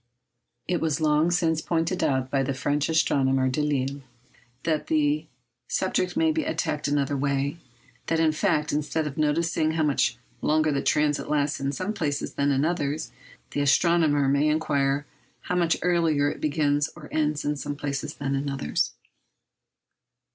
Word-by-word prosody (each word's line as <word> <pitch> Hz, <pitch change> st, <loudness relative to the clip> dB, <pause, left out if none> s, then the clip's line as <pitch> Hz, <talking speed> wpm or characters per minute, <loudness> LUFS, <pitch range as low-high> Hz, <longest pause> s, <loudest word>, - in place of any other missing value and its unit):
It 175 Hz, -1 st, 0 dB
was 155 Hz, -3 st, 0 dB
long 155 Hz, +1 st, +3 dB
since 165 Hz, -3 st, +1 dB
pointed 165 Hz, +2 st, -1 dB
out 130 Hz, -1 st, 0 dB
by 135 Hz, -, +2 dB
the 135 Hz, 0 st, -1 dB
French 145 Hz, +2 st, 0 dB
astronomer 135 Hz, -4 st, +2 dB
Delisle 140 Hz, -1 st, -1 dB, 0.6 s
that 155 Hz, -2 st, -1 dB
the 300 Hz, -1 st, +1 dB, 0.4 s
subject 185 Hz, +10 st, -1 dB
may 320 Hz, 0 st, +3 dB
be 315 Hz, 0 st, -1 dB
attacked 155 Hz, -, -2 dB
another 145 Hz, -1 st, 0 dB
way—that, 140 Hz, +1 st, -3 dB
in 160 Hz, -1 st, +4 dB
fact, 150 Hz, -1 st, 0 dB
instead 150 Hz, +1 st, -1 dB
of 145 Hz, -2 st, -4 dB
noticing 155 Hz, +1 st, +1 dB
how 160 Hz, -1 st, +1 dB
much 135 Hz, -4 st, +1 dB, 0.2 s
longer 155 Hz, 0 st, +2 dB
the 140 Hz, -, 0 dB
transit 150 Hz, -1 st, +1 dB
lasts 145 Hz, -1 st, 0 dB
in 135 Hz, 0 st, -1 dB
some 185 Hz, +7 st, -3 dB
places 145 Hz, -8 st, -2 dB
than 140 Hz, 0 st, +1 dB
in 135 Hz, +2 st, +2 dB
others, 155 Hz, -2 st, -2 dB, 0.4 s
the 145 Hz, -, -1 dB
astronomer 145 Hz, -1 st, +3 dB
may 140 Hz, +2 st, +3 dB
inquire 145 Hz, -2 st, +1 dB, 0.4 s
how 180 Hz, -, -3 dB
much 170 Hz, -2 st, +2 dB
earlier 165 Hz, -5 st, +2 dB
it -, -, -9 dB
begins 145 Hz, -1 st, +1 dB
or 155 Hz, -3 st, -11 dB
ends 150 Hz, -1 st, 0 dB
in 150 Hz, 0 st, 0 dB
some 145 Hz, 0 st, -4 dB
places 145 Hz, +1 st, -4 dB
than 140 Hz, -1 st, -2 dB
in 140 Hz, +1 st, -1 dB
others. 135 Hz, -, -1 dB
150 Hz, 155 wpm, -26 LUFS, 140-160 Hz, 0.6 s, in